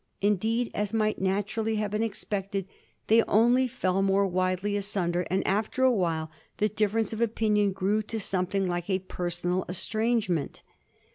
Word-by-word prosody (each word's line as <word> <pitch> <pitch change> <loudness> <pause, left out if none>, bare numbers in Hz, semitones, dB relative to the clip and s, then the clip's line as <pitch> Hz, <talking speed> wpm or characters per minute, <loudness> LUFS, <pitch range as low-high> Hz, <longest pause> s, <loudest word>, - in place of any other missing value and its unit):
Indeed, 220 +4 +1
as 210 +1 -2
might 215 -2 0
naturally 205 +3 0
have 210 -1 -1
been 210 +1 -1
expected, 200 -3 -3 0.4
they 225 +1 +5
only 240 +4 +4
fell 195 -7 0
more 195 0 +3
widely 185 +2 0
asunder, 185 -4 -1
and 190 +1 0
after 215 +6 0
a 260 - +6
while 165 -7 -1 0.3
the 210 +1 +2
difference 215 +1 0
of 220 - -4
opinion 210 -3 +2
grew 200 +3 0
to 220 +1 -5
something 190 -1 -1
like 175 +1 -3
a 190 - +2
personal 180 0 -2
estrangement. 215 - -1
200 Hz, 150 wpm, -27 LUFS, 185-220 Hz, 0.4 s, a